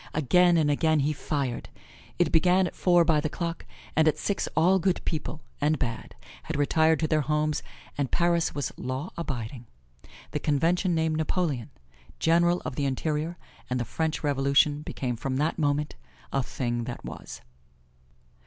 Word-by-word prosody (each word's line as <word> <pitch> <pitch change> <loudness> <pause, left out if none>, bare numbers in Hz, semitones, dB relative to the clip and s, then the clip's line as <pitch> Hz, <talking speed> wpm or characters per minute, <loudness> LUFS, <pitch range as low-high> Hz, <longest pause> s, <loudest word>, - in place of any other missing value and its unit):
Again 175 +4 +4
and 150 -2 +3
again 155 +1 +2
he 150 +2 +1
fired. 140 -4 -3 0.5
It 175 -3 +2
began 180 +3 +4
at - - -5
four 175 -2 +4
by 155 -2 +3
the 155 - -1
clock, 170 +1 -4 0.3
and 160 0 +4
at 155 -1 +3
six 200 +5 -1
all 180 +4 +5
good 185 0 +1
people, 155 -1 -3 0.2
and 150 +2 +2
bad, 120 -5 -4 0.3
had - - -5
retired 160 +2 +3
to 155 - +2
their 155 0 +2
homes, 150 +1 0 0.4
and 140 -3 0
Paris 170 -1 +1
was 145 - -2
law 130 +7 -4
abiding. 125 -6 -5 0.6
The - - -2
Convention 170 +5 +1
named 160 -1 +1
Napoleon, 155 - -1 0.5
General 170 +2 +3
of 125 - -4
the 145 - 0
Interior, 150 +5 -1 0.3
and 125 0 0
the 120 - -1
French 160 +8 -2
Revolution 140 +1 +3
became 125 -5 -3
from 130 +3 -3
that 150 +5 0
moment 145 0 0 0.4
a 135 - +2
thing 120 -2 -3
that 120 - -6
was. - - -8
155 Hz, 160 wpm, -27 LUFS, 140-165 Hz, 0.6 s, all